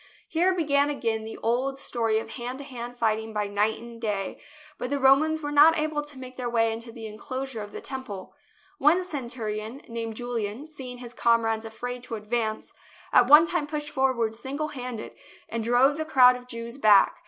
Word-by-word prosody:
Here 350 Hz, +3 st, +2 dB
began 290 Hz, -5 st, +2 dB
again 225 Hz, -6 st, -1 dB
the 220 Hz, -, -7 dB
old 255 Hz, +4 st, 0 dB
story 230 Hz, -5 st, 0 dB
of 220 Hz, -, -4 dB
hand 245 Hz, +1 st, -5 dB
to 280 Hz, -, -7 dB
hand 245 Hz, -3 st, -7 dB
fighting 220 Hz, -1 st, 0 dB
by 210 Hz, -1 st, 0 dB
night 205 Hz, +2 st, 0 dB
and 235 Hz, 0 st, -11 dB
day, 200 Hz, -4 st, -2 dB, 0.4 s
but 250 Hz, -, -3 dB
the 285 Hz, -, 0 dB
Romans 285 Hz, +4 st, +4 dB
were 290 Hz, -, -2 dB
not 300 Hz, +3 st, +7 dB
able 305 Hz, -1 st, 0 dB
to 295 Hz, -2 st, -8 dB
make 255 Hz, -1 st, -9 dB
their 250 Hz, -2 st, -2 dB
way 225 Hz, -1 st, +2 dB
into 230 Hz, +1 st, -7 dB
the 225 Hz, -1 st, -9 dB
enclosure 245 Hz, +3 st, -5 dB
of 205 Hz, 0 st, -8 dB
the -, -, -7 dB
Temple. 260 Hz, -9 st, -7 dB, 0.5 s
One 330 Hz, +6 st, +4 dB
cen 285 Hz, -9 st, -5 dB
turion, 220 Hz, +1 st, -5 dB
named 230 Hz, -1 st, -4 dB
Julian, 240 Hz, +1 st, -3 dB
seeing 265 Hz, -5 st, -8 dB
his 245 Hz, -1 st, -9 dB
comrades 225 Hz, -2 st, +2 dB
afraid 245 Hz, +3 st, -5 dB
to 230 Hz, -, -4 dB
advance, 220 Hz, 0 st, -2 dB, 0.4 s
at 245 Hz, -, +6 dB
one 300 Hz, +3 st, +9 dB
time 335 Hz, -3 st, -1 dB
pushed 295 Hz, -1 st, -4 dB
forward 260 Hz, -5 st, +1 dB
singlehanded 265 Hz, -2 st, -5 dB, 0.3 s
and 230 Hz, -1 st, -3 dB
drove 250 Hz, +5 st, +4 dB
the 315 Hz, -, -1 dB
crowd 255 Hz, -4 st, +6 dB
of 250 Hz, 0 st, -10 dB
Jews 235 Hz, +2 st, -7 dB
back. 210 Hz, -5 st, +6 dB
245 Hz, 190 wpm, -26 LUFS, 225-280 Hz, 0.5 s, one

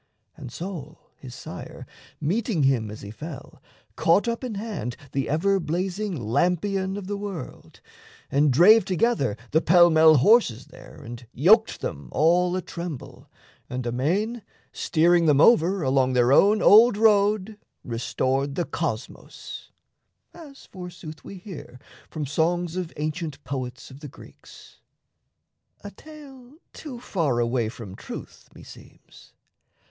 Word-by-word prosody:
And 125 Hz, -, -10 dB
Sol, 165 Hz, -4 st, -8 dB
his 125 Hz, -2 st, -11 dB
sire, -, -, -9 dB, 0.3 s
Meeting 185 Hz, -, -1 dB
him 125 Hz, -5 st, +1 dB
as 105 Hz, -, -9 dB
he 100 Hz, -, -8 dB
fell, 150 Hz, +5 st, -10 dB, 0.3 s
caught 185 Hz, +8 st, +2 dB
up 235 Hz, +2 st, -2 dB
in 240 Hz, -4 st, -4 dB
hand 200 Hz, -, -5 dB
The 135 Hz, -1 st, -2 dB
ever 195 Hz, +6 st, +1 dB
blazing 185 Hz, +4 st, -3 dB
lampion 180 Hz, -, 0 dB
of 200 Hz, -, -7 dB
the 205 Hz, +2 st, -4 dB
world, 195 Hz, -9 st, -8 dB, 0.5 s
And 145 Hz, +1 st, +3 dB
drave 190 Hz, -, +6 dB
together 185 Hz, -, 0 dB
the 160 Hz, -, +3 dB
pell 175 Hz, +1 st, +5 dB
mell 160 Hz, 0 st, +6 dB
horses 135 Hz, -, +3 dB
there 160 Hz, +3 st, -14 dB
And 120 Hz, +1 st, -10 dB
yoked 215 Hz, -, +3 dB
them 70 Hz, -3 st, -6 dB
all 175 Hz, +4 st, +2 dB
a 185 Hz, -, -3 dB
tremble, 170 Hz, -6 st, -8 dB, 0.4 s
and 125 Hz, -1 st, -4 dB
amain, 180 Hz, -, -1 dB, 0.3 s
Steering 170 Hz, +1 st, +2 dB
them 145 Hz, -2 st, +4 dB
over 185 Hz, -1 st, +4 dB
along 130 Hz, -1 st, +2 dB
their 125 Hz, 0 st, +3 dB
own 210 Hz, +7 st, +4 dB
old 220 Hz, +1 st, +7 dB
road, 210 Hz, -1 st, +2 dB, 0.2 s
Restored 130 Hz, +4 st, -2 dB
the 175 Hz, -, -1 dB
cosmos, 125 Hz, -8 st, -6 dB, 0.6 s
as 295 Hz, -5 st, -13 dB
forsooth 175 Hz, -4 st, -10 dB
we -, -, -10 dB
hear 180 Hz, -9 st, -10 dB, 0.3 s
From 155 Hz, -2 st, -4 dB
songs 170 Hz, +4 st, -1 dB
of 180 Hz, -3 st, -4 dB
ancient 155 Hz, 0 st, -4 dB
poets 125 Hz, -2 st, -6 dB
of 130 Hz, -, -12 dB
the 150 Hz, -, -9 dB
Greeks -, -, -16 dB, 1.0 s
A -, -, -8 dB
tale 280 Hz, -4 st, -14 dB, 0.2 s
too 265 Hz, -6 st, -9 dB
far 165 Hz, -, -1 dB
away 120 Hz, -1 st, 0 dB
from 115 Hz, -5 st, -10 dB
truth, -, -, -10 dB
meseems. -, -, -16 dB
170 Hz, 135 wpm, -24 LUFS, 135-200 Hz, 1.0 s, old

